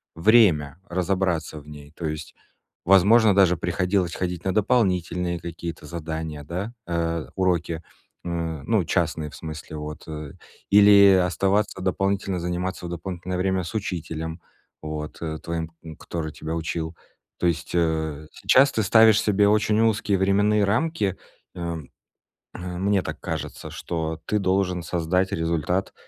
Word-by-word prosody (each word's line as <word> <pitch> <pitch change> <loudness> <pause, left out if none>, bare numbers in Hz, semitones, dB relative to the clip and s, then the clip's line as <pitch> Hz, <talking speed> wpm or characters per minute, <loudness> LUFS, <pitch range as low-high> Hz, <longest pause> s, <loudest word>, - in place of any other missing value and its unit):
время 85 - +4
разобраться 90 -3 -1
в 75 - -16
ней. 75 -1 -11
То 85 - -6
есть, 75 0 -5 0.5
возможно, 100 +3 +6
даже 95 -3 +5
приходилось 90 +1 0
ходить 90 -1 -3
на 95 - +1
дополнительные 90 -6 +1
какие-то 85 -1 -7
задания, 80 -2 -5
да, 95 +9 -5
э, 85 -2 -1
уроки, 85 -3 0 0.4
м, 85 -4 -3
ну, - - +2
частные 75 -2 -1
в - - -12
смысле, 80 -1 -8
вот, 75 +1 -7
э, 75 -3 -7 0.4
или 100 -1 +8
оставаться 95 +4 0
дополнительно 95 0 0
заниматься 90 +1 -3
в - - -6
дополнительное 90 +1 -4
время 95 0 0
с 85 - -7
учителем, 80 -4 -4 0.4
вот, 75 0 -6
э, 80 -2 -3
твоим, 85 -1 -4 0.3
который 80 -2 -4
тебя 80 +1 -5
учил. 80 0 -3 0.4
То - - -1
есть, 85 -1 -2
э, 80 -3 0
сейчас 135 +2 +4
ты 110 - 0
ставишь 110 +2 +6
себе 105 -1 +3
очень 105 0 +2
узкие 105 -3 +2
временные 100 +2 +3
рамки, 110 - 0 0.4
э, 85 -1 -3 0.8
э, 90 0 -6
мне 100 +1 +2
так - - -5
кажется, - - -5
что 80 -1 -4
ты 105 - 0
должен 95 -2 0
создать 90 +3 0
результат 85 +1 -1
90 Hz, 140 wpm, -24 LUFS, 80-95 Hz, 0.8 s, или